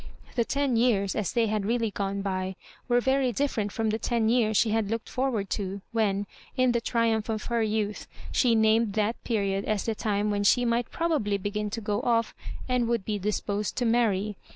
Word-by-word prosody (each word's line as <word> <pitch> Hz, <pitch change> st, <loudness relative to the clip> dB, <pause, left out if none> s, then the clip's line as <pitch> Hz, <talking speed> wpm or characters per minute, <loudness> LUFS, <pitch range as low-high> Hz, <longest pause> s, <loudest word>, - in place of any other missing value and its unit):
The 235 Hz, -, +2 dB
ten 280 Hz, -3 st, 0 dB
years, 210 Hz, -5 st, +2 dB
as 210 Hz, -5 st, -1 dB
they 235 Hz, -1 st, +2 dB
had 215 Hz, -1 st, -1 dB
really 230 Hz, -1 st, 0 dB
gone 200 Hz, 0 st, -2 dB
by, 190 Hz, -1 st, -2 dB, 0.3 s
were 245 Hz, -1 st, +4 dB
very 265 Hz, 0 st, +2 dB
different 225 Hz, -5 st, -1 dB
from 225 Hz, 0 st, 0 dB
the 220 Hz, -, -1 dB
ten 230 Hz, -2 st, +1 dB
years 225 Hz, -3 st, +3 dB
she 220 Hz, -, +3 dB
had 220 Hz, -2 st, 0 dB
looked 225 Hz, 0 st, -3 dB
forward 250 Hz, -6 st, -1 dB
to, 195 Hz, 0 st, -3 dB
when, 205 Hz, -3 st, +1 dB, 0.3 s
in 255 Hz, -1 st, +4 dB
the 235 Hz, -1 st, 0 dB
triumph 230 Hz, -2 st, 0 dB
of 215 Hz, -1 st, -2 dB
her 235 Hz, -, +2 dB
youth, 215 Hz, -1 st, -1 dB, 0.2 s
she 240 Hz, -3 st, +3 dB
named 220 Hz, -1 st, +3 dB
that 215 Hz, +2 st, -1 dB
period 200 Hz, -4 st, 0 dB
as 215 Hz, -2 st, -1 dB
the 225 Hz, -, 0 dB
time 210 Hz, -1 st, 0 dB
when 205 Hz, 0 st, 0 dB
she 245 Hz, +4 st, +4 dB
might 235 Hz, 0 st, 0 dB
probably 295 Hz, -12 st, 0 dB
begin 205 Hz, +2 st, -3 dB
to 225 Hz, +2 st, -4 dB
go 205 Hz, -1 st, -1 dB
oS, 230 Hz, -2 st, +1 dB, 0.3 s
and 250 Hz, -2 st, +1 dB
would 230 Hz, -4 st, 0 dB
be 210 Hz, -2 st, -2 dB
disposed 205 Hz, +1 st, -2 dB
to 245 Hz, -, 0 dB
marry. 215 Hz, -4 st, +1 dB
220 Hz, 200 wpm, -27 LUFS, 205-235 Hz, 0.3 s, were